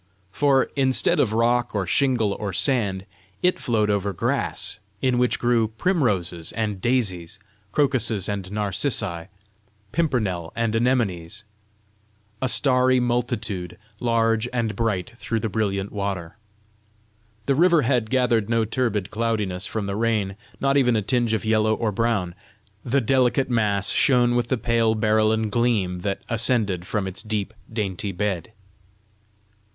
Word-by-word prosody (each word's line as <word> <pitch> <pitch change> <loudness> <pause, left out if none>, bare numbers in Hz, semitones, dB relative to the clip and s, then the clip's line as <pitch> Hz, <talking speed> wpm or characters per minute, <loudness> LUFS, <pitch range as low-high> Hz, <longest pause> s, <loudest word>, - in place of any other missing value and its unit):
For, 135 +3 +2
instead 130 -2 +3
of 105 - +2
rock 120 +1 +1
or 100 -2 0
shingle 115 -1 +1
or 100 -2 -4
sand, 100 -5 0 0.4
it 180 0 +2
flowed 105 -3 +1
over 100 -1 -1
grass - - -1 0.2
in 125 0 +1
which 125 0 +2
grew 120 -2 +2
primroses 105 - -1
and 105 -4 -2
daisies, 100 -8 -1 0.3
crocuses 120 -7 +1
and 100 -2 -4
narcissi, 100 - -2 0.6
pimpernels 110 - -1
and 115 -1 0
anemones, 115 -9 0 1.0
a 130 - +1
starry 130 -1 +3
multitude, 120 -7 -2 0.2
large 115 -1 +1
and 115 -4 -1
bright 105 -5 -1
through 115 -1 -2
the 110 - -2
brilliant 100 -2 -1
water. 100 -5 -4 1.1
The 140 - +2
river 170 +1 +4
had 120 -3 +1
gathered 120 -4 +1
no 115 -1 +2
turbid 110 -4 -1
cloudiness 105 -5 -1
from 110 -2 -3
the 100 0 -3
rain, 105 -3 0 0.2
not 140 0 +2
even 125 -4 +3
a 105 - 0
tinge 120 0 +1
of 110 - -4
yellow 110 0 +2
or 110 -1 -1
brown; 100 -5 0 0.5
the 135 +3 +1
delicate 130 +2 +2
mass 100 -4 +1
shone 120 -2 +3
with 120 -1 +1
the 130 - 0
pale 115 -1 +1
berylline 110 0 +2
gleam 105 -6 +1
that 100 +1 -3
ascended 110 -6 0
from 105 -3 -1
its 95 0 -3
deep, 105 -1 -3 0.2
dainty 100 -3 -3
bed. 95 -1 -3
110 Hz, 135 wpm, -23 LUFS, 100-120 Hz, 1.1 s, river